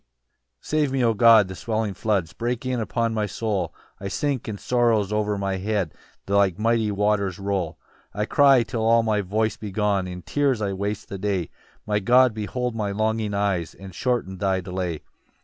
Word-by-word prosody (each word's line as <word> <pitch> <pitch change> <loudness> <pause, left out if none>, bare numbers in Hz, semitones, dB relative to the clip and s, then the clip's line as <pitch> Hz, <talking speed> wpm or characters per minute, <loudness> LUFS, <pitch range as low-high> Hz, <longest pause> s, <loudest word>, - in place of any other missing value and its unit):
1 - - -50 0.5
"Save 150 -3 0
me, 135 -2 +1
O 115 - +3
God, 110 -2 +6
the 95 - -7
swelling 110 0 -2
floods 95 -6 -1
"Break 120 +1 -3
in 130 -1 -1
upon 115 +1 -1
my 105 -1 0
soul: 100 -4 -2 0.3
"I 100 - -5
sink, 140 +4 -2
and 105 -3 -5
sorrows 115 -5 +1
o'er 105 -1 0
my 100 -1 -1
head 100 -3 -1 0.3
"Like 100 -3 +2
mighty 115 0 +1
waters 100 -2 0
roll. 95 -4 -2 0.4
2 105 - -2
"I - - +1
cry 135 -1 +5
till 115 -1 -3
all 115 +1 +4
my 110 -2 +1
voice 110 +3 -1
be 105 - -6
gone, 100 -1 0
"In 90 -1 -7
tears 140 -5 +1
I 100 -2 -1
waste 100 +2 -3
the 100 - -6
day: 95 -4 -1 0.3
"My 105 -1 +1
God 125 +4 +5
behold 120 +3 -3
my 105 -2 -1
longing 110 0 -1
eyes, 100 -5 -1
"And 95 -1 -11
shorten 95 -4 -2
thy 95 -1 +1
delay. 90 -3 -4
105 Hz, 190 wpm, -24 LUFS, 95-115 Hz, 0.5 s, God